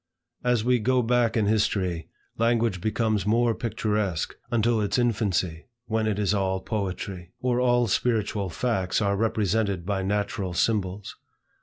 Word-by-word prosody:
As 125 -3 +2
we 125 +1 +3
go 125 +2 +2
back 120 0 +2
in 110 - +2
history, 95 -5 0 0.3
language 115 -4 +1
becomes 110 0 0
more 115 +2 +3
picturesque, 105 -6 -2
until 115 -1 +2
its 105 - 0
infancy, 100 -8 0 0.2
when 110 -1 0
it 105 -2 0
is 105 -1 +1
all 95 -2 0
poetry; 95 -3 -4
or 125 -1 +1
all 120 -1 +3
spiritual 105 -2 0
facts 95 -1 0
are 100 -2 +1
represented 105 -3 0
by 100 0 -1
natural 100 -2 -2
symbols. 100 -1 -1
105 Hz, 140 wpm, -26 LUFS, 95-115 Hz, 0.3 s, we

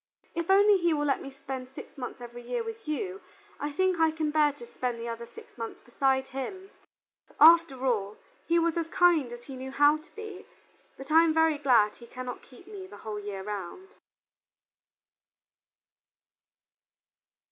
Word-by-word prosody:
If 335 +1 -3
only 405 +1 +6
he 340 -2 +2
will 295 0 -1
let 275 -2 +1
me 275 - -7
spend 265 -1 -7
six 265 - -11
months 250 -2 -7
every 240 0 -9
year 465 - -3
with 450 -4 -8
you, 370 +6 -3 0.4
I 290 - -3
think 370 +3 +1
I 325 0 +5
can 315 -1 -2
bear 300 -1 +4
to 275 -4 -11
spend 245 0 -4
the 230 - -5
other 235 0 -6
six - - -14
months 230 0 -5
beside 265 +2 0
him. 375 +9 -6 0.7
After 315 -4 +6
all, 210 -4 0 0.3
he 335 - +3
was 335 0 +1
as 335 -1 -1
kind 330 -7 +3
as 240 0 -9
he 270 - -9
knew 260 +1 -6
how 290 +2 +4
to 310 - -21
be, 430 -2 -9 0.5
but 270 +2 -9
I 325 +1 +7
am 320 -1 +2
very 320 -2 +3
glad 240 -7 +3
he 235 - -13
cannot 250 +1 -7
keep 250 - -17
me 395 -2 -9
the - - -12
whole 210 -1 -4
year 200 -2 -6
round." 210 - -6
290 Hz, 175 wpm, -28 LUFS, 245-335 Hz, 0.7 s, I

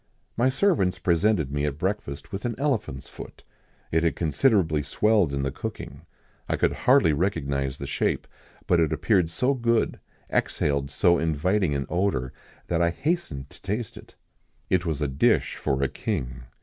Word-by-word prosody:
My 120 +3 +3
servants 135 - +2
presented 85 -4 +1
me 70 0 -1
at 75 -1 -2
breakfast 95 -6 -3
with 95 +1 -5
an 120 -2 -2
elephant's 125 - -2
foot. - - -11 0.5
It 80 - +3
had 85 - +1
considerably 80 - +2
swelled 100 +4 +2
in 70 -1 -2
the 70 - -1
cooking; - - -7 0.4
I - - +2
could - - +2
hardly 130 - +4
recognise 70 -6 -1
the 70 - -6
shape, 70 - -1 0.4
but 90 - +3
it 80 -3 +2
appeared 85 +2 +2
so 125 +12 +1
good, 115 -3 +1 0.3
exhaled 70 -1 0
so 85 +5 +3
inviting 80 +2 +1
an 70 -1 -1
odour, 85 -9 -1 0.3
that 85 -1 0
I 85 - +4
hastened 85 - -2
to 85 -1 -16
taste 105 +3 -3
it. - - -14 0.6
It 90 -2 +2
was 75 -2 -1
a - - +1
dish 65 +1 +2
for 70 0 0
a - - +3
king. 60 -1 -4
85 Hz, 165 wpm, -25 LUFS, 70-105 Hz, 0.6 s, hardly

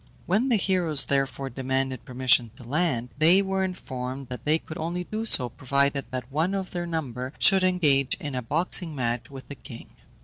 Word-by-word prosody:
When 215 +9 +1
the 240 - +4
heroes, 180 -8 +3
therefore, 135 -1 -1
demanded 130 0 -2
permission 125 -2 +2
to - - -12
land, 135 -4 0
they 175 +5 +5
were 190 0 -1
informed 130 -7 -5
that 125 - -7
they 155 +2 +3
could 160 -1 -9
only 170 +3 -3
do 220 +4 -3
so 125 - +6
provided 140 +3 0
that 125 0 -6
one 165 +7 0
of 190 -1 -4
their 175 -1 -4
number 130 -5 -4
should 190 -2 +5
engage 150 -8 +2
in 145 -2 -7
a 125 - -2
boxing 160 +5 -1
match 120 0 -2
with 135 -2 -11
the - - -7
king. 130 -4 -12
140 Hz, 190 wpm, -26 LUFS, 130-175 Hz, -, so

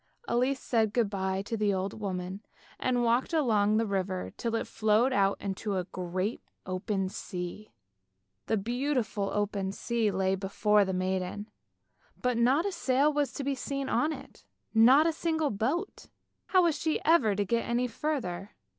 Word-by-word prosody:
Elise 255 +3 +1
said 220 -3 +1
good 230 -5 +2
bye 190 -1 -1
to 225 - -3
the 210 -2 +1
old 190 +1 -2
woman, 190 -1 -4 0.4
and 245 -1 +1
walked 240 +7 +1
along 215 -9 +3
by 225 - +2
the - - -3
river 190 -2 -2
till 230 -1 -2
it - - -1
flowed 220 +4 +2
out 195 -3 +2
into 200 +1 -3
the 185 -1 -1
great 185 +4 -3 0.2
open 190 +1 -2
sea. 185 +1 -6 0.8
The 220 - +2
beautiful 235 -2 -1
open 200 -2 -1
sea 230 +1 0
lay 190 -1 +1
before 200 +2 +2
the 190 - -2
maiden, 185 +3 -2 0.7
but 250 -1 0
not 255 +8 +3
a 400 - 0
sail 290 -3 +2
was 290 -1 0
to 280 - -4
be 280 +1 0
seen 275 +1 -3
on 305 - +2
it, - - -10 0.3
not 250 +7 +7
a 330 - +2
single 320 -2 0
boat. 275 - -2 0.4
How 370 -2 +4
was 335 -3 +3
she 315 - 0
ever 270 -11 +4
to 205 0 0
get 235 +4 0
any 240 +1 +1
further 230 - -3
220 Hz, 170 wpm, -29 LUFS, 195-260 Hz, 0.8 s, not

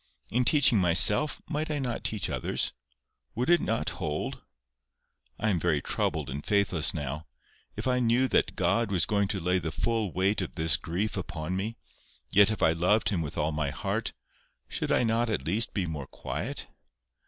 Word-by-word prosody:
In 125 +2 +1
teaching 135 -6 +6
myself, 95 - +4
might 155 +2 -3
I 150 - -1
not 125 -4 -3
teach 110 -3 0
others? 65 -5 -1 0.6
Would 125 +8 0
it 175 - +6
not 115 +1 -1
hold? 75 0 -3 1.0
I 110 - 0
am 95 -5 +1
very 80 -3 +1
troubled 75 +1 -2
and 70 +3 -5
faithless 95 -7 +1
now. 75 +1 -5 0.5
If - - -4
I 125 0 +2
knew 120 +2 +2
that - - +1
God 100 +5 +1
was 90 -4 +2
going 100 -2 +1
to 100 -1 -2
lay 90 +1 +1
the 80 -2 -4
full 110 +1 -1
weight 95 +4 +1
of 95 - -6
this 80 -1 +4
grief 90 +7 -3
upon 90 -2 -4
me, 110 +5 -3 0.5
yet 100 +1 +6
if 110 - -2
I - - +5
loved 90 +7 +2
Him 95 -5 -1
with 75 -1 -6
all 75 0 0
my 75 -2 -1
heart, - - -3 0.6
should - - -3
I - - +3
not 115 +1 +1
at 75 -11 -2
least 105 +8 +1
be 100 -4 -2
more 75 -5 -5
quiet? - - -5
95 Hz, 185 wpm, -28 LUFS, 80-115 Hz, 1.0 s, teaching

